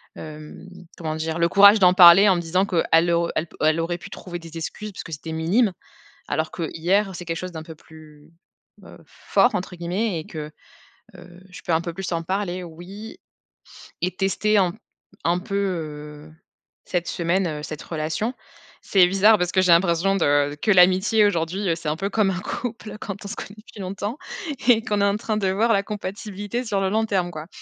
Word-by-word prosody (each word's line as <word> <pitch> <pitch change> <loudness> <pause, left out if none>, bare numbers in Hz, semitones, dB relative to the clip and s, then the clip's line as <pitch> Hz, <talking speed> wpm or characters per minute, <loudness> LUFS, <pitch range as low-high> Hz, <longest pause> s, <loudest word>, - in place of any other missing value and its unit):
hem, 155 -1 -10 0.3
comment 155 -2 -4
dire? 160 +1 -3
Le 170 0 +3
courage 200 +3 +7
d'en 180 -2 +6
parler 180 +2 +9
en 190 - +5
me 175 - -1
disant 180 +3 +1
qu'elle 170 -2 +2
au 170 0 +1
elle 155 - 0
p - - -18
elle 155 +1 +3
aurait 170 +1 -2
pu - - -10
trouver 175 -2 -8
des 165 -1 -10
excuses 210 +6 -6
puisque 175 - -9
c'était 160 +2 -6
minime, 185 +7 +1 0.6
alors 155 +2 -2
qu'hier 185 +4 -1
c'est 175 - -8
quelque 165 -1 -3
chose 185 0 -5
d'un 160 -1 -7
peu 160 - -10
plus 155 -1 -17 0.5
heu, - - -13
«fort», - - +1
entre 180 0 -5
guillemets, 175 +2 -2
et 155 - -11
que 155 -1 -7 0.7
heu, 175 0 -14
je - - -11
peux - - -2
un 160 - +3
peu 170 0 -5
plus 195 0 -5
en 165 -1 -1
parler. 185 0 -3
Oui. 185 - -10 0.8
Et 180 - 0
tester 205 +2 +1
un 185 -3 +2 0.5
un 170 +1 +2
peu, 195 +2 -6
heu, 155 -5 -5 0.5
cette 175 -2 -2
semaine 170 -3 -1
cette 155 0 -6
relation. 160 +9 -3 0.5
C'est 190 -3 +4
bizarre 200 +4 +5
parce 180 -2 -1
que 185 - +3
j'ai 180 -2 +3
l'impression 170 +2 +2
de 145 -3 +2
que 215 - +2
l'amitié 190 +4 +5
aujourd'hui, 190 +1 -1
heu, 165 - +2
c'est 165 -2 -4
un 150 - -1
peu 195 +3 -2
comme 210 -1 +2
un 180 - -3
couple 220 0 -6
quand 200 -1 -7
on - - -4
se 225 - -5
connaît 205 - -8
depuis 215 -1 -12
longtemps 200 +6 -4 0.5
et 225 -2 +5
qu'on 210 -4 -1
est - - +4
en 200 0 +1
train 215 -1 -2
de 195 -3 0
voir 220 +5 +2
la 200 -1 +2
compatibilité 205 +2 -5
sur 205 -3 -1
le 190 - +1
long 220 +3 +1
terme, 185 -5 -1
quoi. 155 -1 -8
180 Hz, 200 wpm, -23 LUFS, 165-200 Hz, 0.8 s, parler